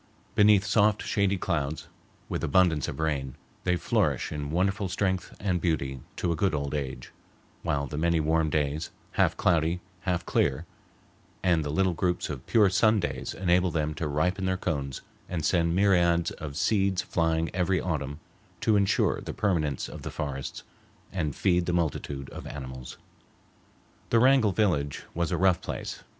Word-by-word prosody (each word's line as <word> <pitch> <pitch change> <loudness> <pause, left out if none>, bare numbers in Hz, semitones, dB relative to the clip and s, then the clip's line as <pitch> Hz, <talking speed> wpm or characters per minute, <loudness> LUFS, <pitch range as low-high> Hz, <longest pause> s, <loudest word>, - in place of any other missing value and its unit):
Beneath 105 -1 +5
soft, 105 0 +3
shady 100 -1 +1
clouds, 80 -4 -2 0.4
with - - -3
abundance 80 -2 +3
of - - -5
rain, 70 -5 -1 0.3
they 90 -1 +3
flourish - - 0
in 75 -1 -4
wonderful 95 +4 0
strength 95 -1 -1
and 90 -4 0
beauty 70 -6 -1 0.2
to 85 - -1
a - - +1
good 95 +1 +1
old 70 -1 -3
age, 70 -3 -4 0.5
while 70 -1 -1
the 75 +2 -5
many 85 0 +2
warm 80 0 +2
days, 75 +1 -1 0.2
half - - +2
cloudy, 85 0 +2 0.2
half 90 -2 -2
clear, 70 +4 +1 0.8
and 85 -4 +3
the 75 - -3
little 95 +4 +2
groups 90 -1 -1
of 70 -4 -8
pure 110 -4 +5
sun 110 +3 +3
days 70 -7 -3
enable 90 0 +2
them 75 -2 -1
to 80 +1 -3
ripen 90 +7 0
their 95 0 +1
cones 70 -7 -3 0.3
and 80 -4 -2
send 85 +1 +2
myriads 85 -3 +3
of 75 -2 -7
seeds 100 -3 +2
flying 80 -1 0
every 90 0 +1
autumn 75 -4 -3 0.4
to 110 - +3
insure 100 -1 +2
the - - -6
permanence 80 -9 0
of - - -9
the - - -5
forests 70 -3 -5 0.5
and 80 -7 -2
feed 90 -2 +2
the 90 - 0
multitude 70 -4 -2
of - - -8
animals. 65 -3 -7 1.1
The 115 - +4
Wrangell 130 -4 +5
village 85 -9 0
was 85 -1 -1
a - - +1
rough 95 -2 +3
place. - - -5
85 Hz, 165 wpm, -28 LUFS, 75-95 Hz, 1.1 s, Beneath